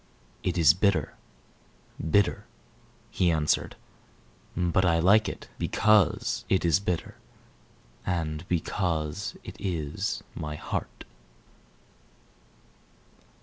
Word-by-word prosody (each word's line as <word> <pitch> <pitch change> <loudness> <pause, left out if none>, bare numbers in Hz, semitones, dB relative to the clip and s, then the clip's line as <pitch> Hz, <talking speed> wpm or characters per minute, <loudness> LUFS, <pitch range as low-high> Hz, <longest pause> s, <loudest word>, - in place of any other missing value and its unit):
"It 90 -1 -1
is 80 -3 +7
bitter 95 -5 +1 0.9
bitter," 90 +4 +1 0.7
he 90 - +2
answered; 80 -2 +1 0.8
"But 90 +1 +2
I 85 -3 +3
like 100 +5 +4
it - - -9
Because 95 - +2
it 95 -2 +2
is 85 +3 +4
bitter, 90 -4 -3 0.9
And 80 -3 -2
because 80 -3 -2
it - - -9
is 85 +1 -3
my 75 0 -5
heart." - - -5
85 Hz, 90 wpm, -27 LUFS, 75-95 Hz, 0.9 s, is